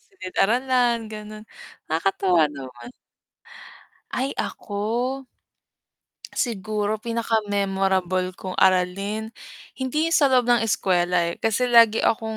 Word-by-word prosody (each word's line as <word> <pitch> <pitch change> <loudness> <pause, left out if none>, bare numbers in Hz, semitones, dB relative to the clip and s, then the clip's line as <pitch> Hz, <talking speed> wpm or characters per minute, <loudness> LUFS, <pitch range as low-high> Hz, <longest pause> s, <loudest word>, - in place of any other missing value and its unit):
silid-aralan 240 - 0
ganon. 215 0 -9 0.4
Nakakatuwa 170 0 +2
naman. 130 - -10 1.2
Ay 265 +2 -2
ako? 235 +6 -3 1.1
Siguro, 215 -2 -1
pinakamemorable 195 -5 0
kong 185 -1 -6
aralin, 195 +4 +1 0.5
hindi 300 +5 -1
sa 280 -3 +4
loob 250 -2 +3
ng 240 -1 +3
eskuwela 180 -5 +1
eh, 170 - -3
kasi 225 +3 0
lagi 230 -2 +6
akong, 225 - +1
215 Hz, 90 wpm, -23 LUFS, 185-235 Hz, 1.2 s, lagi